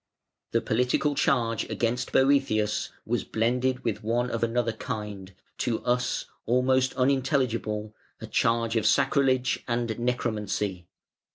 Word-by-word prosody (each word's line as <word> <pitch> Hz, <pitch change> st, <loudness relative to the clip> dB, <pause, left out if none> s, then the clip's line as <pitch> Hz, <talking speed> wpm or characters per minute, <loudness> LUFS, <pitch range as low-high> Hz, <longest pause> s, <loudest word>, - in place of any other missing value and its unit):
The -, -, +1 dB
political 125 Hz, +4 st, +1 dB
charge 115 Hz, -5 st, +1 dB
against 120 Hz, +1 st, -1 dB
Boëthius 135 Hz, -6 st, +2 dB, 0.2 s
was -, -, -1 dB
blended 125 Hz, +3 st, 0 dB
with 115 Hz, -4 st, -2 dB
one 120 Hz, +3 st, 0 dB
of 115 Hz, -, -2 dB
another 115 Hz, 0 st, +1 dB
kind, 105 Hz, -5 st, -6 dB, 0.3 s
to 120 Hz, -1 st, -1 dB
us 125 Hz, 0 st, 0 dB, 0.2 s
almost 130 Hz, +2 st, +2 dB
unintelligible, 125 Hz, -5 st, 0 dB, 0.3 s
a -, -, -7 dB
charge 115 Hz, 0 st, +1 dB
of 110 Hz, -, +2 dB
sacrilege 135 Hz, -2 st, +2 dB
and 120 Hz, -2 st, -1 dB
necromancy. 105 Hz, -6 st, -2 dB
120 Hz, 115 wpm, -27 LUFS, 110-130 Hz, 0.3 s, Boëthius